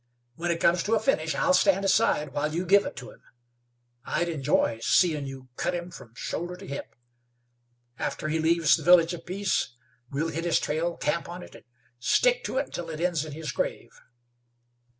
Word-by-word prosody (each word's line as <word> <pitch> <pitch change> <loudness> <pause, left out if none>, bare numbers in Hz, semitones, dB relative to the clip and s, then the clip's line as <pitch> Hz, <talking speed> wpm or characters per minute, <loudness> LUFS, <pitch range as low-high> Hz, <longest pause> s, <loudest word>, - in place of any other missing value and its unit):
When 175 +6 -4
it 170 -1 0
comes 170 +1 +3
to 220 +5 +1
a - - +2
finish, 160 - 0
I'll 280 - +2
stand 195 -6 +3
aside 150 -8 +2
while 150 +1 -1
you 175 +2 -1
give 200 +3 +4
it - - -7
to 125 0 -9
him. - - -19 0.8
I'd 175 +7 -1
enjoy 135 -6 +1
seein' 155 -3 +2
you 130 -1 -9
cut 180 - -1
him 175 0 -5
from 115 -9 -13
shoulder 175 +7 -4
to 190 +2 -11
hip. 140 -5 -7 1.0
After - - -3
he 160 +1 0
leaves 165 -1 +4
the - - -6
Village 175 -1 +6
of 170 -1 -9
Peace 190 -9 -1 0.3
we'll 150 +4 -1
hit 165 +1 -4
his 170 - +3
trail, 165 +3 -2
camp 170 +3 -1
on 175 +1 -7
it, - - -13
and - - -15 0.3
stick - - +3
to - - -3
it - - +1
until 170 -1 -6
it 155 -1 -6
ends 170 -3 0
in 155 - -8
his 155 +1 -5
grave." - - -3
170 Hz, 195 wpm, -27 LUFS, 150-180 Hz, 1.0 s, Village